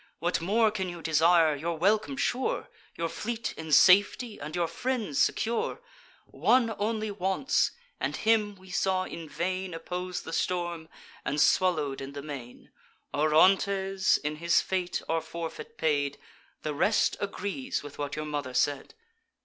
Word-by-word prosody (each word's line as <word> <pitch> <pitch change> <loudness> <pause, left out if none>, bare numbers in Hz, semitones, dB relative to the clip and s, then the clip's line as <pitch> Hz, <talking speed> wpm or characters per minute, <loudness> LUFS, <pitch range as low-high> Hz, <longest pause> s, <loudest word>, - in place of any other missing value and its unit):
What 175 0 -1
more 215 +5 +3
can 190 -3 -3
you 170 -2 -8
desire, 160 0 +4
your 165 +3 -3
welcome 215 - +1
sure, 280 - -1 0.3
Your 165 - -1
fleet 230 +6 -4
in 160 -1 -7
safety, 205 - +5
and 150 +3 -6
your 175 -1 +1
friends 220 - 0
secure? 230 - -1 0.5
One 235 -3 +2
only 215 0 -1
wants; 195 +6 +1 0.3
and - - -1
him 215 -2 +2
we 190 0 -15
saw 185 +1 +1
in 165 -4 -8
vain 185 +1 -3
Oppose 180 +2 -4
the 165 - -7
Storm, 175 -2 -2 0.3
and 145 +2 -1
swallow'd 150 -6 +2
in 135 +1 -7
the 140 -1 -6
main. 135 -5 -9 0.4
Orontes 190 +5 +3
in 150 +1 -4
his 170 +2 +3
fate 185 -2 -2
our 165 0 0
forfeit 170 +9 -7
paid; 145 -5 0 0.5
The 155 - -2
rest 200 +9 +2
agrees 205 - -3
with 145 0 -10
what 145 -1 -3
your 155 0 -4
mother 145 -4 -4
said." 145 - 0
180 Hz, 150 wpm, -28 LUFS, 155-205 Hz, 0.5 s, safety